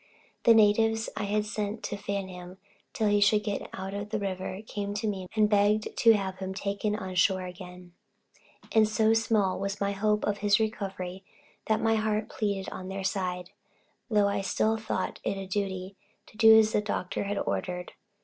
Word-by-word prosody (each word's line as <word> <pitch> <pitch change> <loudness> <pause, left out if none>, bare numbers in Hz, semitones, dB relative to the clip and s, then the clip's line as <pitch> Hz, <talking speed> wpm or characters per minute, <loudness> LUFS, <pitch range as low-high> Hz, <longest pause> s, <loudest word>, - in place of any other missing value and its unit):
The 230 - +8
natives 225 +1 +3
I 210 0 -2
had 210 +1 0
sent 210 0 -4
to 205 - -3
fan 200 -1 -3
him 180 0 -10 0.3
till 220 - 0
he 205 0 +3
should 210 +1 +4
get 205 -1 -3
out 190 +1 -6
of 205 +1 -5
the 215 - -1
river, 190 0 -4
came 205 -1 -4
to 215 +2 -2
me 190 -3 -3
and 215 -1 +4
begged 210 +1 +2
to 230 -1 +6
have 190 -3 -2
him 190 0 -4
taken 200 +1 -2
on 190 -3 -5
shore 185 +1 +2
again: 180 -1 -10 0.8
and 220 -1 +4
so 220 +1 +3
small 220 -4 +1
was 200 +1 -3
my 200 0 0
hope 210 +1 0
of 205 -1 -1
his 205 0 +3
recovery, 195 -4 -3 0.4
that 220 0 +2
my 225 0 +3
heart 215 0 -1
pleaded 200 -3 -2
on 185 - -7
their 190 0 -5
side, 180 -2 -2 0.6
though 210 -3 +3
I 200 - 0
still 215 +3 +1
thought 220 -4 -3
it 195 - -1
a 195 - -5
duty 190 0 -3 0.3
to - - -19
do 220 0 +8
as 220 0 +4
the 210 - +2
doctor 200 -2 -3
had 200 0 -2
ordered. 180 -1 -3
205 Hz, 190 wpm, -28 LUFS, 190-215 Hz, 0.8 s, The